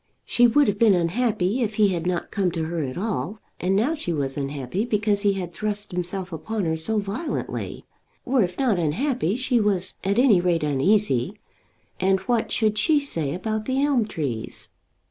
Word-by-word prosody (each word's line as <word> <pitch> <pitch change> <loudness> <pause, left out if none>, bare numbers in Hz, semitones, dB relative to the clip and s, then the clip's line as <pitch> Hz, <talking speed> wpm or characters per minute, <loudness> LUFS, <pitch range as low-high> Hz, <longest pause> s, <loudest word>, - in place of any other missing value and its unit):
She 245 0 +4
would 285 +4 +4
have 205 0 0
been 220 -4 +6
unhappy 205 +4 0
if 215 -2 -1
he 210 -2 +4
had 175 -2 -2
not 180 -1 -2
come 195 -3 +1
to 165 -2 -2
her 165 +1 -2
at 130 -3 -4
all, 210 0 -2 0.2
and 185 +2 +1
now 235 +10 +2
she 295 - -3
was 140 -4 -1
unhappy 140 - -3
because 210 -3 +1
he 200 -1 +3
had 180 -3 -5
thrust 205 +2 -2
himself 180 +1 -4
upon 205 +5 -3
her 160 0 0
so 160 +8 -1
violently, 210 +10 -4 0.4
or 255 -1 +2
if 180 -2 -1
not 240 -9 +2
unhappy, 205 - 0
she 255 -1 +1
was 195 -3 +1
at 200 +2 0
any 240 -8 +5
rate 175 -3 +1
uneasy. 145 - +1 0.6
And 190 +1 +3
what 230 +3 0
should 215 -2 +1
she 305 +4 +4
say 165 - -3
about 215 +3 -3
the 265 +1 0
elm 265 -7 +2
trees? 135 - -4
200 Hz, 185 wpm, -24 LUFS, 170-225 Hz, 0.6 s, been